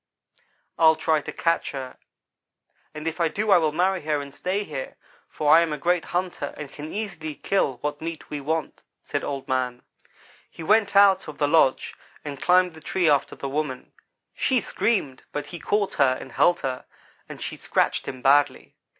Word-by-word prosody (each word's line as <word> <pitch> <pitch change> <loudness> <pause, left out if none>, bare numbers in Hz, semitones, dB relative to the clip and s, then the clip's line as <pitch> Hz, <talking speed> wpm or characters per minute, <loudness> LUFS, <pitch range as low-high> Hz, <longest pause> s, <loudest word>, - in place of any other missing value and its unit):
"'I'll 160 -1 +6
try 155 -1 +1
to - - -6
catch 165 -2 0
her, 130 -2 -6 0.9
and 155 +1 -7
if 165 +2 -3
I 165 - +4
do 210 +6 -1
I 190 - +7
will 155 -2 +1
marry 180 +3 +1
her 150 -1 -1
and 140 -1 -8
stay 190 +7 -2
here, 145 -8 -6 0.3
for 150 0 +4
I 165 - +7
am 165 -2 0
a 150 - -2
great 175 +3 +1
hunter 175 -5 -3
and 145 -2 -7
can 150 +2 -8
easily 175 -8 -5
kill 190 -9 0
what 145 0 -3
meat 165 0 -6
we 145 -1 -4
want,' 160 +2 -3 0.2
said - - -3
Old 140 -2 -4
man. 125 -1 -1 0.7
"He 165 - -10
went 205 +2 +3
out 195 -2 +6
of 155 - -8
the 145 - +2
lodge 145 -4 +3 0.3
and 140 -2 -6
climbed 180 -1 +4
the 160 - -13
tree 180 +1 0
after 145 -2 +2
the 140 - -5
woman. 135 -2 -3 0.4
She 260 -2 +1
screamed, 170 - -1
but 145 -1 -4
he 175 - -8
caught 205 +4 0
her 130 -1 +4
and 135 - -10
held 175 0 +3
her, 130 -2 -3 0.4
although - - -8
she - - -5
scratched - - 0
him 130 -1 -6
badly. 145 +1 +3
155 Hz, 190 wpm, -25 LUFS, 145-180 Hz, 0.9 s, I